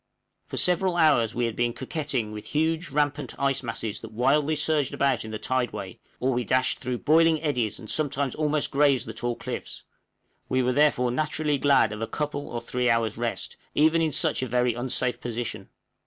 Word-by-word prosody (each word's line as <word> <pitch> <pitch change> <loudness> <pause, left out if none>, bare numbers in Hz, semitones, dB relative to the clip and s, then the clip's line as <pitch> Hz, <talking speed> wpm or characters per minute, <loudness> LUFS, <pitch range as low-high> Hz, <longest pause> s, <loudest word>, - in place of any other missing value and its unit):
For - - -6
several 180 0 +2
hours 120 -9 +4
we 120 0 +1
had 115 -2 -3
been 120 0 0
coquetting 130 -4 -3
with 105 0 -8
huge 160 +3 +1
rampant 145 -2 -1
ice 140 -1 +1
masses 115 -3 -4
that - - -9
wildly 140 +7 +2
surged 150 -3 +1
about 135 -4 +1
in 110 - -7
the 110 - -4
tideway, 105 -5 -3 0.2
or 130 +1 +1
we 125 0 0
dashed 130 +3 +1
through 125 -1 -3
boiling 160 +1 +5
eddies, 125 -9 0
and 110 - -10
sometimes 140 -1 -1
almost 150 -1 0
grazed 140 -4 +3
the 110 - -5
tall 120 +1 -2
cliffs; - - -6 0.7
we 130 0 +2
were 125 +1 +1
therefore 135 -3 +3
naturally 150 +1 0
glad 140 -6 +4
of 105 - -7
a 115 - -1
couple 145 -1 -3
or 120 - -4
three 125 +1 -1
hours' 115 -2 +1
rest, 120 0 -3 0.2
even 160 +2 +4
in 160 -1 +1
such - - 0
a 130 - -2
very 125 0 +1
unsafe 125 +1 -2
position. 120 -1 -5
130 Hz, 190 wpm, -26 LUFS, 120-150 Hz, 0.7 s, boiling